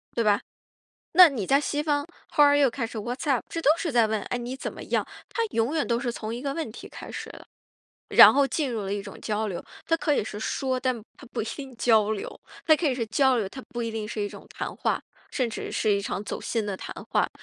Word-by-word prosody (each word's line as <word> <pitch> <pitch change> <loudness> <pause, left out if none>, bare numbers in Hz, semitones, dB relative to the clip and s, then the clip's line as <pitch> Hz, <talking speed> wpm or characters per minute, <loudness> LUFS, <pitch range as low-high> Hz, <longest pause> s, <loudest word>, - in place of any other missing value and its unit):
对 230 - +2
吧？ 205 -1 +4 0.7
那 360 0 +10
你 235 -10 -3
在 275 +1 +4
西 295 0 -1
方 290 -1 +1 0.3
how 295 - +8
are 285 0 +5
you 280 - +5
开 235 0 -3
始， 225 -1 -5
what‘s 245 +7 -3
up？ 255 -4 +2
这 330 - -4
都 290 - +5
是 330 -3 -2
在 230 -3 +4
问， 215 -1 0
诶， 245 - -3
你 245 +2 -5
怎 - - -5
么 - - -9
样？ - - 0 0.2
它 460 - -1
永 230 +7 +1
远 310 - +1
都 235 -1 +1
是 245 - -1
从 225 0 -5
一 245 - -6
个 280 -1 -1
问 300 -6 -3
题 - - -10
开 - - -10
始 - - -6
的。 - - -12 0.7
然 - - +11
后 280 0 +4
进 275 -3 -1
入 225 - -2
了 195 0 -2
一 205 - -3
种 200 -1 -10
交 215 0 -1
流， 175 - -4 0.2
它 330 - +3
可 315 -2 +1
以 210 - 0
是 210 - -6
说， 260 +3 -1
但 255 -1 0 0.2
它 275 - -12
不 - - -2
一 - - -3
定 265 +2 -7
交 220 -3 +4
流， 205 - -6 0.3
它 315 - +7
可 315 +1 -1
以 265 - +1
是 245 -2 -1
交 265 +2 +3
流， 215 -4 0
它 265 - -8
不 240 -2 -4
一 230 - -2
定 220 -1 -4
是 215 -2 -3
一 - - 0
种 - - -10
谈 - - -5
话， - - 0 0.3
甚 255 -4 0
至 - - -5
是 215 - +1
一 200 - +2
场 200 0 -4
走 - - -4
心 225 -2 -1
的 205 -2 -3
谈 - - -7 0.2
话， - - +2
240 Hz, 325 characters per minute, -26 LUFS, 220-280 Hz, 0.7 s, 然